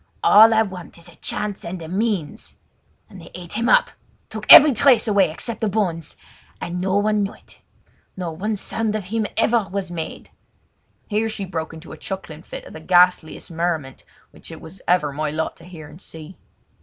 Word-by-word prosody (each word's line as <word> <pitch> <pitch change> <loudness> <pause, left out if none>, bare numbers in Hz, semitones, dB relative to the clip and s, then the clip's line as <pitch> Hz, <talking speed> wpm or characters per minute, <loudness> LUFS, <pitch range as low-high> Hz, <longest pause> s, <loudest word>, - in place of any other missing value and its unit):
All 220 +2 +8
I 220 0 +4
want 185 -5 -9
is 170 0 -11
a 170 - -17
chance 205 -2 -3
and 180 +2 -6
a 160 - -8
means! 190 -4 -3 0.5
And - - -13
they - - -13
ate 175 -1 -9
him 230 +2 0
up—took - - 0
every 300 -1 +11
trace 245 -1 +4
away 200 -4 +3
except 230 +10 -4
the 220 - +1
bones; 180 -7 -2 0.4
and 175 +1 -4
no 190 +1 0
one 210 0 +1
knew 200 0 -3
it, - - -21 0.6
nor 170 -3 -4
no 210 +5 -2
sound 215 +2 -2
of 215 - -3
him 215 +3 -2
was - - -23
ever 230 -4 +2 0.2
heard!" 165 -2 -6 0.8
Here 220 +1 0
she 210 -2 -5
broke 160 -3 -5
into 160 +1 -12
a - - -9
chuckling 190 -6 -7
fit - - -9
of - - -12
the - - -8
ghastliest 175 0 +2
merriment 160 -5 -3 0.3
which - - -13
it - - -9
was 170 +3 -12
ever 170 -5 +2
my 150 +1 -2
lot 160 +2 -3
to 165 - -14
hear 165 -4 -11
and 165 +5 -14
see. 160 +1 -10
185 Hz, 195 wpm, -21 LUFS, 165-215 Hz, 0.8 s, every